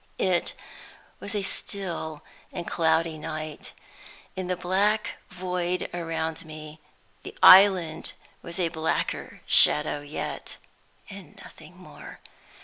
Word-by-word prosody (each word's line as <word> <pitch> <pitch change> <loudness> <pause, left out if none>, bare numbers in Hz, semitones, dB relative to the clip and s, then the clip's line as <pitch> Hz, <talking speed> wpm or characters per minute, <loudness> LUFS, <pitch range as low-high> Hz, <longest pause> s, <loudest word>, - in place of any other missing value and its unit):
It 180 -2 +1 0.7
was 200 - -4
a 205 - -1
still 170 -7 -5 0.3
and 175 -2 -5
cloudy 160 -1 +1
night. 155 0 -6 0.6
In 185 -1 -4
the 180 - 0
black 205 +5 +1
void 180 -1 -3
around 165 -2 -3
me, 155 -1 -10 0.4
the - - -10
island 185 -4 +7 0.3
was 170 +2 -5
a 170 -2 +1
blacker 160 0 -2
shadow 150 0 +5
yet, 145 +1 -6 0.5
and - - -12
nothing - - -15
more. - - -12
170 Hz, 110 wpm, -26 LUFS, 160-185 Hz, 0.7 s, island